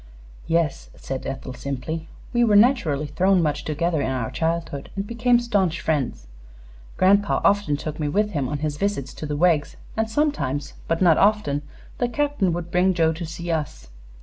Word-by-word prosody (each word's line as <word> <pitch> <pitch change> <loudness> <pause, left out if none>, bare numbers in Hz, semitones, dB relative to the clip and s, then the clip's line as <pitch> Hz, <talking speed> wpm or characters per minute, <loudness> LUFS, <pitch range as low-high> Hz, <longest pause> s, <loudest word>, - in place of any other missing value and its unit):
"Yes," 165 -3 0
said 135 -1 -5
Ethel, 135 -1 -5
simply; 140 +5 -5 0.3
"we 240 0 +3
were 215 -3 +4
naturally 205 - +4
thrown 185 +6 +2
much 150 -3 0
together 160 +1 0
in - - -1
our 125 -4 -2
childhood, 165 -4 -2
and 195 0 -2
became 235 +2 +2
staunch 195 -9 0
friends. 145 - -1 0.7
Grandpa 200 +2 +4
often 200 -8 +3
took 155 +1 -6
me 150 - -1
with 210 +7 +1
him 140 -8 -1
on 150 - -2
his 150 -1 -2
visits 195 -10 -2
to 155 - -6
the 145 0 -2
Weggs, 160 -3 +2 0.2
and 220 0 0
sometimes, 220 - -1
but 165 +2 +1
not 165 -3 +5
often, 200 -9 +2 0.4
the 245 - +1
Captain 285 -7 0
would 170 0 -4
bring 180 +1 +3
Joe 160 -1 +3
to 165 +1 -6
see 170 +2 -5
us. 105 - -3
165 Hz, 175 wpm, -23 LUFS, 145-205 Hz, 0.7 s, not